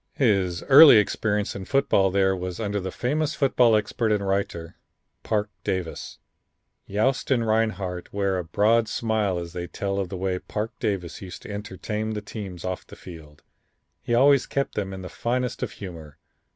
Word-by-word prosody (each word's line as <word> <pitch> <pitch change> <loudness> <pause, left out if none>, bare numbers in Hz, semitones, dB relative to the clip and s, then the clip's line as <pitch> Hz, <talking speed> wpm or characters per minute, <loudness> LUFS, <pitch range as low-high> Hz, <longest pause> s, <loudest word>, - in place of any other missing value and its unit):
His 95 -9 +1
early 140 -2 +9
experience 105 0 0
in 95 - -6
football 100 -7 +2
there 95 0 +2
was 90 +1 -5
under 105 -2 -1
the 95 0 -4
famous 150 - -1
football 125 -5 +4
expert 110 +1 0
and 100 -2 0
writer, 90 -4 -2 0.5
Parke 105 -1 -1
Davis. 90 -3 -4 0.7
Yost 120 +7 0
and 120 -4 +2
Rinehart 110 -5 -1
wear 100 -2 0
a - - -3
broad 110 +7 +2
smile 110 -4 0
as 85 -1 -6
they 90 0 -4
tell 100 +1 -3
of 95 -2 -2
the 95 - -5
way 95 0 -1
Parke 105 +4 -5
Davis 95 -5 -3
used 90 -2 -9
to - - -8
entertain 105 +2 -4
teams 100 -5 -7
off 95 0 -4
the - - -12
field. 80 -4 -13 0.6
He 120 - 0
always 140 +2 +5
kept 140 0 -2
them 100 -2 -3
in 95 -1 -7
the - - -6
finest 125 +5 -2
of - - -3
humor. 85 -7 -9
100 Hz, 170 wpm, -25 LUFS, 90-110 Hz, 0.7 s, early